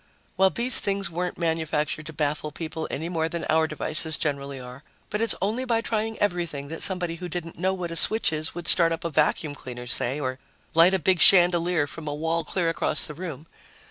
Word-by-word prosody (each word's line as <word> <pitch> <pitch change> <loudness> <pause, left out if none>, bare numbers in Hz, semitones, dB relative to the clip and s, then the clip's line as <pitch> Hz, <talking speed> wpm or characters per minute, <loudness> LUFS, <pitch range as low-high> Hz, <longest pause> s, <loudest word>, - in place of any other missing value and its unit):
Well, 190 0 +4
these 240 +5 0
things 200 -2 0
weren't 180 +2 -4
manufactured 160 -2 -2
to - - -7
baffle 150 0 -2
people, 160 +1 -6
any 160 +4 -4
more 165 -2 -2
than 170 0 -5
our 160 0 +2
devices 155 0 +4
generally 140 -2 -4
are. 125 +1 -11 0.3
But 210 +1 -2
it's 230 -2 +2
only 220 +6 -1
by 230 -3 0
trying 225 -1 -3
everything 170 -8 -3
that 165 - -7
somebody 180 -3 +2
who 180 +1 -7
didn't 165 -1 -7
know 190 +1 0
what 175 -2 -5
a - - -5
switch 220 0 +4
is 155 +1 -4
would 175 -1 -7
start 170 -2 +4
up 165 +1 -4
a 170 - -2
vacuum 150 0 0
cleaner, 125 -3 -9
say, 125 +3 +4
or 130 -2 -4 0.3
light 170 +4 +5
a - - +2
big 185 +1 +1
chandelier 175 -3 +4
from 155 +1 -10
a 145 - -3
wall 165 +2 -1
clear 170 +2 -2
across 165 -2 0
the 150 - -7
room. 160 -3 -8
165 Hz, 210 wpm, -24 LUFS, 150-180 Hz, 0.3 s, light